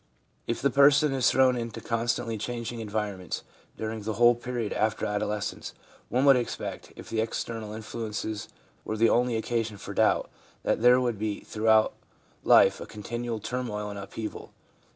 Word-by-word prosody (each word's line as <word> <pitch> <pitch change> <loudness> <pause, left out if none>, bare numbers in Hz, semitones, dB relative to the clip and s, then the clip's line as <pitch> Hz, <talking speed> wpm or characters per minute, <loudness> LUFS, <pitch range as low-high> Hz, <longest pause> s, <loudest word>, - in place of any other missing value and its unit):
If 115 - -2
the 140 - +3
person 140 +1 +5
is 130 -2 +3
thrown 130 -1 +4
into 115 -2 -4
constantly 115 0 -1
changing 115 +2 -4
environments 105 -4 -3 0.3
during 110 0 -4
the 110 +1 -3
whole 120 +2 +6
period 120 -2 -3
after 110 0 0
adolescence, 105 0 -3 0.3
one 130 +3 +2
would 140 -1 +8
expect, 120 - -4
if - - -11
the 110 - +1
external 110 -1 -4
influences 110 -1 -5 0.4
were 110 - -3
the 115 +1 +4
only 125 -1 +2
occasion 110 -1 -2
for - - -7
doubt, - - +2 0.4
that - - 0
there 125 +1 +7
would 120 -4 -1
be 105 -1 -2
throughout 110 0 +3 0.5
life - - +6
a - - -7
continual 120 +2 -4
turmoil 105 -3 -3
and 100 - -6
upheaval. 110 +2 -7
115 Hz, 155 wpm, -27 LUFS, 105-120 Hz, 0.5 s, would